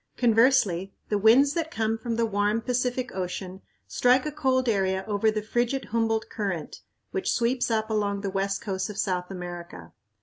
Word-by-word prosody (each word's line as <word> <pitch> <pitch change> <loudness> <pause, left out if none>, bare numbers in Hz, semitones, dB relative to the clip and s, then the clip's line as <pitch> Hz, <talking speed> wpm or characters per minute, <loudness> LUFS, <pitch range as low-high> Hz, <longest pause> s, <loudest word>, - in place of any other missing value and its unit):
Conversely, 225 -6 +3
the 210 - +1
winds 250 +7 +5
that 330 -1 -2
come 225 -8 -1
from 230 +1 -3
the 230 0 +1
warm 210 +1 0
Pacific 250 +1 -1
Ocean 185 0 -5 0.3
strike 250 +2 +3
a 300 - -2
cold 260 -3 +1
area 190 -3 +1
over 210 +1 +2
the 215 -1 -2
frigid 240 +4 -1
Humboldt 225 -1 0
Current, 190 -7 -4 0.3
which 385 -2 -1
sweeps 245 +1 +1
up 220 -1 0
along 200 -2 0
the 200 -1 -3
west 195 0 -1
coast 190 -2 -3
of 210 - -7
South 180 -4 -1
America. 175 - -8
220 Hz, 170 wpm, -26 LUFS, 195-245 Hz, 0.3 s, winds